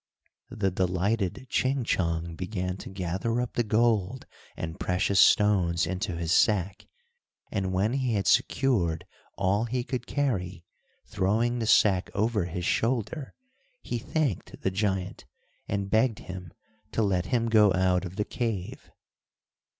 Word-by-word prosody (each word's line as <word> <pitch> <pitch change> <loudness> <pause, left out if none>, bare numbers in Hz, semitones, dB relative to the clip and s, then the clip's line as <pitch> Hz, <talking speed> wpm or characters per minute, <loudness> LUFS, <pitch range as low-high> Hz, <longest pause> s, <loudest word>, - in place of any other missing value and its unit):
The 105 -6 -1
delighted 95 +5 -1
Ching 130 +1 0
Chong 85 -5 -1
began 90 0 -3
to - - -9
gather 95 +5 -2
up 125 -1 -3
the - - +1
gold 110 +1 +1 0.3
and 80 0 -5
precious 90 +2 +1
stones 90 -5 +4
into 95 +1 -3
his 85 -1 -2
sack, 100 -1 +2 0.6
and 95 -3 -1
when 100 +5 +1
he 130 -4 0
had 100 - 0
secured 90 -11 +2 0.3
all 100 +3 +1
he 125 +1 -2
could 125 -1 -4
carry, 95 - -2 0.4
throwing 110 +5 0
the 115 - -2
sack 100 -4 +4
over 105 -2 +1
his 90 0 -4
shoulder, 130 +6 -1 0.5
he 120 - -3
thanked 140 - -2
the 95 - +1
giant, 95 -1 -2 0.4
and 100 -1 -2
begged 110 0 +3
him 90 -2 -8 0.4
to 115 - +1
let 95 -3 0
him 120 -3 +1
go 105 -3 +5
out 90 0 +2
of 90 0 -7
the 105 - -1
cave. 115 -7 -4
100 Hz, 140 wpm, -27 LUFS, 90-115 Hz, 0.6 s, go